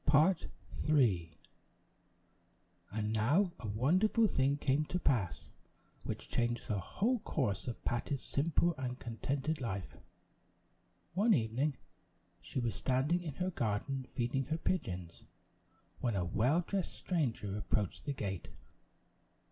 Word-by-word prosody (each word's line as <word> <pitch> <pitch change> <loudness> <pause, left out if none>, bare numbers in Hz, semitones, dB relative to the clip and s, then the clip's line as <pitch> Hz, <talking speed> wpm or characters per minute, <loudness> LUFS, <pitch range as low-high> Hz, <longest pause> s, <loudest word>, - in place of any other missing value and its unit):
The 145 - +2
Well 150 +1 +8
dressed 185 -1 +1 0.4
Stranger 115 - +3 1.6
And 105 +1 -1
now, 145 - +3
a 115 - -5
wonderful 180 - +3
thing 140 -7 +2
came 140 +1 +2
to 180 - -1
pass, 110 - 0 0.6
which - - -4
changed 120 0 0
the 105 -3 0
whole 230 - 0
course 100 - -1
of 120 - -5
Patty's 130 +3 -1
simple 170 +4 +2
and 125 -1 -3
contented 135 +6 -2
life. 100 -6 -3 1.2
One 210 +4 +5
evening, 125 +3 0 0.6
she 90 +9 -3
was 120 -2 0
standing 130 - +1
in 155 -6 -5
her 185 +4 -1
garden, 130 - -1
feeding 125 +2 -1
her 155 +4 -1
pigeons, 90 - -2 0.8
when 120 -4 0
a 90 -2 +1
well 125 - +3
dressed 195 -2 -2
stranger 120 - -1
approached 105 -1 -1
the 145 - -1
gate. 95 -7 -4
130 Hz, 130 wpm, -34 LUFS, 110-155 Hz, 1.6 s, Well